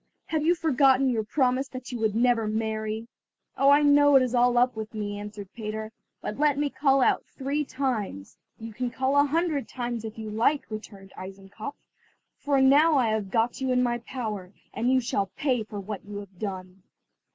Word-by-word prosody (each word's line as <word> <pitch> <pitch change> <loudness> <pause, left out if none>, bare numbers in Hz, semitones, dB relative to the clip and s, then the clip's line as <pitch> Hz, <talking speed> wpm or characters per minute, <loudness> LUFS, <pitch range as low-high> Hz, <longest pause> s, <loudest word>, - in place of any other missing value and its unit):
"Have 315 -1 0
you 340 +3 +4
forgotten 270 -4 +3
your 225 -2 0
promise 260 +3 +1
that 255 -1 -8
you 225 -3 0
never 230 +1 +2
would 215 - -2
marry?" 220 0 -2 0.5
"Oh, 275 - +4
I 290 +1 +6
know 290 0 +6
it 265 - +7
is 250 -1 -2
all 245 0 +3
up 245 0 +3
with 220 0 -6
me," 205 -1 -4
answered 205 -2 -9
Peter, 215 -1 -5 0.3
"but 210 - -5
let 295 -2 +3
me 290 -1 0
call 270 -1 +3
out - - +2
three 280 +3 -2
times." 240 - -3 0.2
"You 225 0 -8
can 250 +3 -2
call 260 +3 -1
a 285 0 +5
hundred 315 -1 0
times 240 -2 -4
if 220 0 -7
you 220 -1 -6
like," 240 +7 +1
returned 200 -3 -9
Eisenkopf, 195 +7 -8 0.6
"for 285 -2 +1
now 290 +4 +5
I 250 -5 +3
have 215 -3 -1
got 230 +5 0
you 260 -1 0
in 250 0 +3
my 240 -1 0
power, 215 -7 -5 0.2
and 245 +3 0
you 260 - +4
shall 200 -4 -1
pay 260 -6 0
for 210 -1 -7
what 200 0 -6
you 205 0 -8
have 195 -3 -10
done." 185 -2 -6
240 Hz, 195 wpm, -26 LUFS, 215-270 Hz, 0.6 s, it